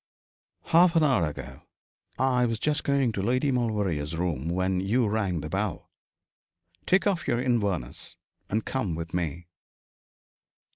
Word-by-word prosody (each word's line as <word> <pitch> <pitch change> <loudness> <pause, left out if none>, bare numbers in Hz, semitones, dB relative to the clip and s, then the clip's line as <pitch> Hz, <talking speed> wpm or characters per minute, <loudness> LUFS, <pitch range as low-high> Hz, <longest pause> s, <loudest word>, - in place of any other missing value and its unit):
'Half 170 +1 +4
an 165 - +5
hour 130 - +3
ago. 75 - -8 0.6
I 125 -2 +2
was 115 -1 -1
just 150 +5 -1
going 140 -4 +2
to 100 - -3
Lady 125 +7 +1
Maulevrier's 100 - -1
room 80 -4 -2
when 95 +1 0
you 110 +5 +1
rang 100 -6 -1
the 75 - -5
bell. 95 -1 -3 1.0
Take 190 +1 +3
off 195 -4 0
your 120 -3 +1
Inverness, 105 - -1 0.3
and 110 +2 -1
come 110 -11 -2
with 85 0 -6
me.' 85 -1 -2
105 Hz, 140 wpm, -27 LUFS, 90-130 Hz, 1.0 s, an